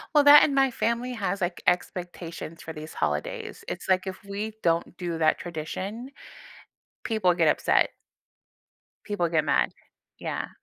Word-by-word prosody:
Well, 295 - +7
that 290 +1 +10
and 280 - +2
my 270 -1 +4
family 235 +2 -1
has, 200 -4 -2
like, 175 -2 -2
expectations 175 -2 -2
for 160 - -7
these 155 0 -8
holidays. 75 0 -3
It's - - -5
like 185 0 +2
if 190 +1 -6
we 205 +2 -4
don't 170 +1 +1
do 170 -2 -3
that 155 -1 +3
tradition, 185 - -5 0.9
people 215 -5 +2
get 170 -2 +3
upset. - - +3 1.2
People 205 -5 -1
get 160 -2 +2
mad. - - +2 0.5
Yeah. - - -3
180 Hz, 145 wpm, -26 LUFS, 165-220 Hz, 1.2 s, that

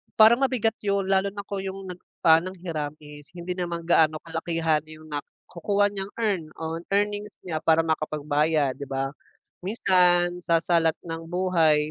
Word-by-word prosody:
parang 225 +3 +7
mabigat 245 -4 +1
'yun 200 -1 +1
lalo 195 0 +2
na 200 - -5
kung 200 - -3
'yung 195 0 -5
nag 180 -1 -7 0.3
ng 170 +4 +4
hiram 155 -5 -3
is 150 0 -13
hindi 180 +1 -5
naman 170 -2 -4
gaano 155 -2 +4
kalakihan 165 -2 -1
'yung 155 0 -13
nakukuha 180 +7 -2
niyang 195 0 -5
earn 205 -7 0 0.2
o 160 0 -3 0.2
earnings 205 +1 0
niya 160 -3 -3
para 160 0 +4
makapagbayad, 150 -2 0
di 140 - -7
ba? 135 0 -2 0.5
Minsan 180 -3 +3
sa 170 -2 +1
salat 165 -2 +2
ng 165 -1 -6
buhay 165 -4 +2
170 Hz, 155 wpm, -25 LUFS, 155-190 Hz, 0.5 s, parang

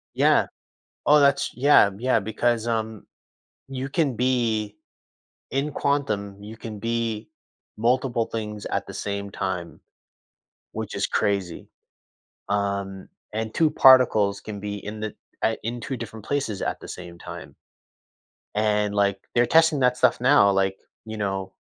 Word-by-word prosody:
Yeah. - - +4 0.6
Oh, 150 +1 +6
that's 140 -1 +3
Yeah, 140 -5 +6
yeah, 125 +1 +2
because, 110 +2 0
um, 110 -2 -2 0.6
you 135 0 -5
can 145 -4 0
be 110 -4 0 0.7
In 140 +2 -1
quantum, 105 -10 -1
you 110 +2 -9
can 110 -1 -8
be 115 0 -2 0.5
multiple 120 0 +1
things 105 -2 -5
at - - -2
the - - -9
same 100 0 -4
time, 95 -3 -4 0.9
which - - -5
is - - 0
crazy. 100 -4 -1 0.8
Um, 100 -1 -2 0.3
and 110 0 -3
2 160 -2 +3
particles 110 -7 +5
can 105 -2 -7
be 105 0 -4
in 105 +1 -6
the 110 -1 -5 0.3
I 110 - +2
in 120 +2 -3
2 135 +4 -4
different 110 -2 -8
places 135 -9 -2
at - - -2
the - - -11
same 90 -1 -9
time - - -9 1.0
and, 105 -1 +1
like, 100 -1 +2 0.2
they're 120 0 +5
testing 160 +1 +4
that 125 -1 +3
stuff - - +3
now, 125 -5 +5
like, 95 0 +1 0.3
you 110 0 -6
know, 95 -2 -3
110 Hz, 140 wpm, -24 LUFS, 100-125 Hz, 1.0 s, Oh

